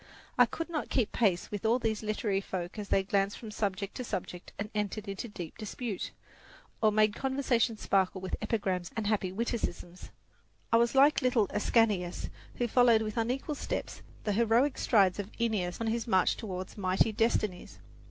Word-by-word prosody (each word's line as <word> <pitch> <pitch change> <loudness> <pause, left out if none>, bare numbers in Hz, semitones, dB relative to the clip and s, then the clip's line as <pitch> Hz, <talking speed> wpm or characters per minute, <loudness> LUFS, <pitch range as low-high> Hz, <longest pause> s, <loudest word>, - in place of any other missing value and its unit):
I - - +6
could 330 - -4
not 325 -3 -3
keep 230 -5 +1
pace 195 -7 +1
with 205 -2 -4
all 225 +2 +3
these 225 -3 -1
literary 210 -2 -1
folk 185 +1 -5
as 205 - -6
they 195 - +3
glanced 200 +1 0
from 220 -2 -8
subject 200 -1 -2
to 255 - -3
subject 180 -5 -5
and 210 +1 -4
entered 210 0 -2
into 195 +4 -4
deep 175 -7 -8
dispute, 215 -1 -4 0.7
or 215 -1 +5
made 215 0 +3
conversation 260 -4 0
sparkle 190 -2 +1
with 185 0 -3
epigrams 190 -5 -1
and 220 - -1
happy 205 -3 0
witticisms. 190 -4 -4 0.6
I - - +8
was 235 +2 +2
like 285 +2 +6
little 250 -4 +3
Ascanius, 210 -5 +1 0.2
who 240 - 0
followed 235 -2 +5
with 215 -1 -4
unequal 250 +6 -1
steps - - -4 0.2
the 210 - 0
heroic 235 +6 +3
strides 195 -5 +3
of 200 0 -4
Aeneas 205 -7 0
on 230 - -2
his 225 +1 -1
march 190 -5 +3
toward 185 -4 -6
mighty 190 +3 +2
destinies. 215 -4 -1
215 Hz, 170 wpm, -30 LUFS, 195-230 Hz, 0.7 s, I